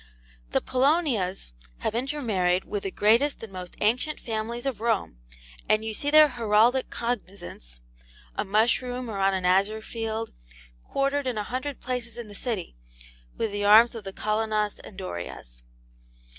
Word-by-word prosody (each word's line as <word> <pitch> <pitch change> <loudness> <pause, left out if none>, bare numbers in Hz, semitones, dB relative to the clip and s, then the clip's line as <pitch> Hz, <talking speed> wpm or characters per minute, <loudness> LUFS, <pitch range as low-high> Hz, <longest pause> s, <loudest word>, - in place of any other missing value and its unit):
'The - - +1
Polonias 255 - +1 0.3
have - - -1
intermarried 225 -9 0
with 205 - -3
the 195 - -3
greatest 230 +8 +2
and 215 -4 -8
most 180 -1 -7
ancient 250 +8 +1
families 230 +2 -4
of 255 -6 -2
Rome, 220 - 0 0.5
and 215 +1 +3
you 220 - -2
see 285 +7 0
their 305 0 +8
heraldic 235 +1 +3
cognizance 195 - -5 0.5
(a - - 0
mushroom 240 +4 +1
or 200 - -4
on 195 0 +3
an 185 -1 -2
azure 200 +4 +2
field) 225 -1 -4 0.5
quartered 275 0 0
in 245 -3 -1
a 210 - -1
hundred 260 +5 -4
places 240 -2 -3
in 235 -3 -7
the - - -10
city 205 - -3 0.6
with 225 - -1
the 205 0 -2
arms 220 +4 +7
of 225 -3 -7
the 195 - -6
Colonnas 215 0 -1
and 190 - -12
Dorias. 85 - -7
220 Hz, 155 wpm, -26 LUFS, 200-250 Hz, 0.6 s, their